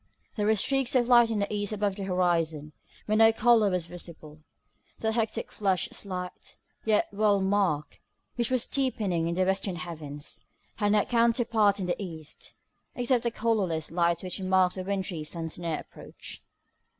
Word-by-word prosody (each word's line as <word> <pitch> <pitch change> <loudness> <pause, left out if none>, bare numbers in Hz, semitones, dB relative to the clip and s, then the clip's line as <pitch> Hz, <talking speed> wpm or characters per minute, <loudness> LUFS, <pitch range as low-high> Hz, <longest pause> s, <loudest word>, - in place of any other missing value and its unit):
There 210 -1 0
were 220 - +4
streaks 270 +4 +1
of 240 -2 +3
light 240 -2 +6
in 225 - -1
the 200 0 -1
east 205 0 -1
above 205 -2 -1
the 195 -1 -5
horizon, 165 -5 0 0.3
but 215 +1 +1
no 225 0 +7
colour 225 -2 +4
was 180 -3 -1
visible. 165 -3 -11 0.6
That 220 0 -1
hectic 225 -1 -2
flush 195 -3 0
slight, 180 -2 -6 0.3
yet 215 -1 +3
well 205 -1 +3
marked 190 -6 0 0.4
which 235 -2 0
was 255 -2 +1
deepening 210 - 0
in 170 - -1
the 185 +1 +2
western 190 0 0
heavens, 155 -5 -7 0.4
had 205 -1 +2
no 210 -1 +3
counterpart 230 -3 +2
in 190 - -2
the 180 +3 -2
east, 160 -5 -9 0.4
except 245 0 +1
the 235 - 0
colourless 205 -10 -1
light 170 0 +1
which 185 +1 -4
marked 185 -1 +3
the 185 - -5
wintry 190 -4 -3
sun's 165 +1 -5
near 165 -3 -2
approach. - - -11
195 Hz, 165 wpm, -28 LUFS, 175-220 Hz, 0.6 s, no